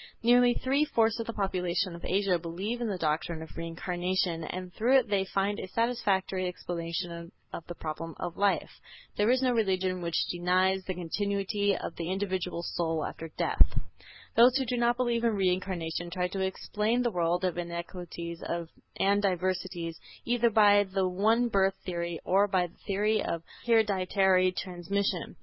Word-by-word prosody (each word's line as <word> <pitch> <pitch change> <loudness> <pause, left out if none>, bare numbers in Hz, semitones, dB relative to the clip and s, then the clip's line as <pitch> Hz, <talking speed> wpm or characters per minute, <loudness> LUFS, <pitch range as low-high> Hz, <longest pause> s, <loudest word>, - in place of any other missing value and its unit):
Nearly 245 +1 +5
three 275 +3 +1
fourths 230 -6 +2
of 230 - -3
the 230 - -3
population 185 -2 -1
of 170 - -10
Asia 190 -2 +1
believe 190 +8 -4
in 235 - 0
the 200 -3 -2
doctrine 160 0 -1
of 160 - -12
Reincarnation, 175 +1 -2
and 180 +1 -6
through 250 +5 +4
it 255 - +1
they 195 -2 +1
find 195 +2 -1
a - - -5
satisfactory 195 -4 0
explanation 170 -1 -5 0.2
of 165 - -7
the 175 - -6
problem 165 +1 -5
of 175 -1 -4
life. 200 0 +1 0.4
There 205 +2 +2
is 255 +1 +3
no 255 - +3
religion 190 -5 0
which 170 -1 0
denies 185 +2 +2
the 185 - -3
continuity 200 +2 -1
of - - -6
the 170 0 -3
individual 185 -3 -2
soul 165 -2 -1
after 165 - -6
death. - - +3 0.6
Those 245 +3 +7
who 265 - 0
do 245 +1 -1
not 240 0 +2
believe 240 -2 0
in 230 -2 +2
Reincarnation 180 -3 -1
try 180 +1 -1
to 195 - -4
explain 210 +5 0
the 240 - +1
world 175 0 0
of 175 -1 -1
inequalities 170 0 -6 0.6
and 200 +1 +3
diversities 185 -3 -1 0.3
either 240 0 +3
by 205 -2 +6
the 190 -1 -1
one 220 +6 +2
birth 195 -3 +2
theory 170 -2 -3
or 195 +3 +4
by 185 -3 +2
the 170 - -13
theory 210 +2 +1
of 165 -1 -3 0.2
hereditary 190 -4 +3
transmission. 185 +1 -2
190 Hz, 165 wpm, -29 LUFS, 175-210 Hz, 0.6 s, Those